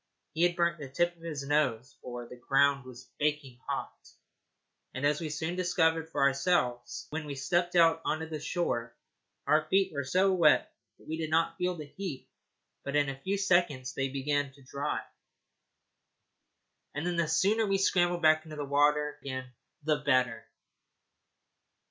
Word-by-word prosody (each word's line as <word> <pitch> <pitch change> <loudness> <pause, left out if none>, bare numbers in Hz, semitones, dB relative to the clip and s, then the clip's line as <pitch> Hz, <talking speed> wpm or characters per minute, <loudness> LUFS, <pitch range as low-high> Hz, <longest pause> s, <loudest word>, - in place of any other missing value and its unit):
He 160 - -2
had 175 0 +3
burnt 170 -1 +1
the 140 -3 -7
tip 175 +6 0
of 170 - -24
his 150 -4 -5
nose, 135 -4 0
for 120 -1 -7
the 125 - -10
ground 140 +2 +2
was 130 0 -12
baking 145 -4 -1
hot, - - -3 1.0
as 145 +4 +1
we 160 - -3
soon 160 +3 -3
discovered 165 -3 +1
for 145 -3 0
ourselves. 135 -3 +1
When 155 0 -4
we 140 - -5
first 135 - -6
stepped 175 0 +1
out 165 -1 +5
on 155 0 -2
shore, 130 -8 -2 0.5
our 155 0 +3
feet 195 -1 +2
were 140 -1 -2
so 185 +8 +2
wet 170 -5 +4 0.2
that - - -20
we 160 - -3
did 160 -1 -3
not 165 +1 +2
feel 180 0 0
the 155 -3 -7
heat, 160 -1 -7 0.6
but 140 - -4
in 145 -1 +3
a 135 0 -7
few 195 +5 -1
seconds 175 -9 +1
they 135 0 -1
began 140 +1 -1
to 140 0 -19
dry, 140 +3 -3 1.9
and 145 +3 -3
then 175 -1 -1
the 170 -2 +2
sooner 200 +8 +2
we 195 0 +2
scrambled 175 -2 +2
back 155 0 +5
into 155 -2 -9
the 145 - -3
water 150 +1 +2
again, 130 -2 -5 0.3
the 155 0 +2
better. 130 -6 +1
150 Hz, 165 wpm, -30 LUFS, 140-170 Hz, 1.9 s, out